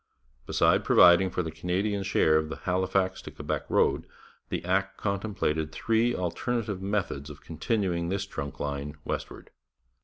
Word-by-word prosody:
Besides - - +3
providing 90 +2 +6
for 90 - -2
the 80 - -4
Canadian 95 +5 -1
share 95 -5 +3
of 80 0 +1
the 80 - -4
Halifax 95 +1 0
to - - -8
Quebec - - -4
road, - - +2 0.4
the - - -3
Act 95 +2 0
contemplated 100 -7 -1
three 115 +2 +1
alternative 100 +3 -2
methods 95 -8 -2
of 75 -1 -11
continuing 85 0 -1
this 100 +1 -1
Trunk 70 -7 -6
line 70 0 -4
westward. - - -5
95 Hz, 145 wpm, -28 LUFS, 80-100 Hz, 0.4 s, providing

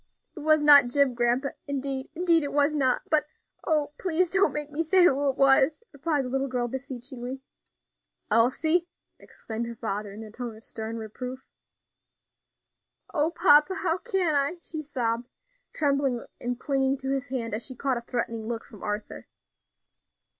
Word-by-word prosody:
"It - - -8
was 310 0 +3
not 285 -3 +8
Jim, 275 +1 +2
grandpa, 240 +3 +1 0.2
indeed, 275 -1 -2
indeed, 335 -1 +4
it 285 - -3
was 290 +1 +3
not; 265 -4 +1
but 310 -1 +4 0.4
oh! 300 -2 0
please 360 -1 +1
don't 380 +1 +3
make 295 0 -4
me 300 +3 -1
say 360 +3 +4
who 285 -4 +3
it 265 - -3
was," 275 +6 +4
replied 290 -1 -1
the - - -4
little 270 +1 -1
girl, 250 -2 -1
beseechingly. 260 0 -6 0.9
"Elsie!" 315 +10 +3 0.3
exclaimed 225 +1 -6
her 235 - -7
father, 210 -2 -4
in 210 +3 -9
a 215 - -11
tone 235 -1 -7
of 220 - -17
stern 220 +1 -6
reproof. 250 +4 -7 1.7
"O 310 -1 +2
papa! 340 0 +4
how 360 -2 0
can 385 -8 0
I?" 285 +4 +1
she 315 -2 -6
sobbed, 245 -5 -2 0.4
trembling 275 -5 0
and 245 0 -3
clinging 270 -1 0
to 265 0 -4
his 275 0 -2
hand 240 -5 -3
as 220 +2 -2
she 260 - -4
caught 265 0 -1
a - - -4
threatening 230 -2 -3
look 230 -1 -4
from 210 - -14
Arthur. 210 0 -5
270 Hz, 165 wpm, -27 LUFS, 240-300 Hz, 1.7 s, not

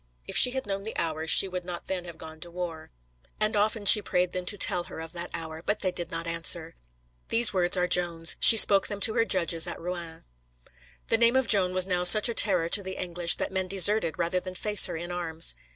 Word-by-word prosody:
"If - - -7
she - - +5
had 265 +1 -6
known 195 -1 -6
the 220 +2 -9
hour 160 -1 -5
she 195 - +4
would 180 -1 -8
not 175 -1 -9
then 180 -2 -6
have 170 -2 -12
gone 160 0 -13
to 175 - -11
war. 170 -2 -9 0.5
And 215 +1 -2
often 210 0 -2
she 210 +1 +8
prayed 180 -2 -3
them 180 -1 -8
to 205 - -4
tell 175 -2 -1
her - - -12
of 160 0 -11
that 175 0 -8
hour, 160 -1 -8
but 210 - -4
they 185 - -2
did 175 -1 -6
not 165 0 -7
answer." 165 0 -2 0.6
These 230 -2 +4
words 180 0 0
are 180 0 -1
Joan's. 170 -2 0
She 225 - +7
spoke 200 -2 +6
them 205 - -8
to 220 - +2
her 230 -1 -1
judges 170 -5 -1
at - - -7
Rouen. 170 -2 -9 0.8
The 225 - 0
name 235 +1 +2
of 265 -1 0
Joan 195 -5 +2
was 185 -1 +1
now 180 -2 -3
such 210 +5 +9
a 235 - -4
terror 180 -7 +1
to 200 +4 -2
the 190 -1 -9
English 175 -1 +1
that - - -6
men 190 -1 -4
deserted 195 -2 +2
rather 175 +1 -3
than 185 0 -10
face 210 +1 +1
her - - -8
in 175 +2 -9
arms. 165 - -3
180 Hz, 240 wpm, -24 LUFS, 170-200 Hz, 0.8 s, such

